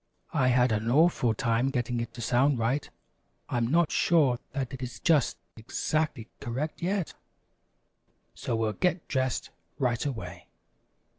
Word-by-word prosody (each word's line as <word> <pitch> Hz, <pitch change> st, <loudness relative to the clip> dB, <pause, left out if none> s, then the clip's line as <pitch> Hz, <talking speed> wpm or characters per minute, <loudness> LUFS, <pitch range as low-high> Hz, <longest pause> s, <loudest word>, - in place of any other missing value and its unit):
I 130 Hz, -, +3 dB
had 125 Hz, -1 st, +4 dB
an 110 Hz, +1 st, 0 dB
awful 135 Hz, -5 st, +3 dB
time 115 Hz, +3 st, +1 dB
getting 120 Hz, -2 st, -1 dB
it 115 Hz, 0 st, -4 dB
to 120 Hz, -, -7 dB
sound 125 Hz, +4 st, +3 dB
right. 120 Hz, +5 st, 0 dB, 0.6 s
I'm 120 Hz, -1 st, 0 dB
not 165 Hz, +4 st, +3 dB
sure 145 Hz, -8 st, +3 dB
that 135 Hz, -1 st, -3 dB
it 130 Hz, -, -7 dB
is 125 Hz, -2 st, -6 dB
just 155 Hz, -7 st, +2 dB, 0.2 s
exactly 125 Hz, +2 st, -2 dB
correct 140 Hz, +5 st, -4 dB
yet. 185 Hz, 0 st, -1 dB, 1.2 s
So 130 Hz, -3 st, -3 dB
we'll 110 Hz, -1 st, 0 dB
get 180 Hz, -, 0 dB
dressed 130 Hz, -3 st, -1 dB, 0.3 s
right 125 Hz, -3 st, 0 dB
away. 135 Hz, -6 st, -5 dB
130 Hz, 140 wpm, -28 LUFS, 120-145 Hz, 1.2 s, had